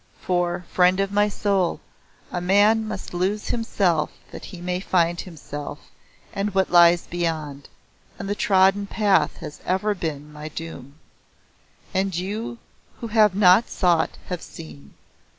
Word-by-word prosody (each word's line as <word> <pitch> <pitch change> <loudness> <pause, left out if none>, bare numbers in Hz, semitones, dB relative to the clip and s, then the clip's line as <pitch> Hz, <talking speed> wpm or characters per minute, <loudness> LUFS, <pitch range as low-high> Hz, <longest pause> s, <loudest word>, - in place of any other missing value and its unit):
For, 175 -1 -1
friend 180 +1 +4
of 195 0 0
my 205 +1 +3
soul, 195 -3 0 0.5
a 175 - -3
man 205 +4 +3
must 210 -4 -6
lose 190 +4 -1
himself 185 -9 +1 0.2
that - - -9
he 185 - -10
may 180 +1 -2
find 175 -2 +1
himself 145 -4 -8 0.6
and 200 0 -2
what 190 -1 +2
lies 175 0 +6
beyond, 155 -5 -4 0.5
and 195 - -6
the 205 - 0
trodden 195 0 +3
path 205 -2 +2
has 150 -3 -8
ever 190 +3 0
been 150 -5 -5
my 150 +1 -7
doom. 145 -4 -8 1.0
And 190 -1 0
you 210 +6 -4 0.4
who 230 - -5
have 210 -3 +4
not 195 +2 +5
sought 175 -3 +1
have 180 -2 -5
seen. 70 -3 -12
185 Hz, 140 wpm, -23 LUFS, 170-200 Hz, 1.0 s, lies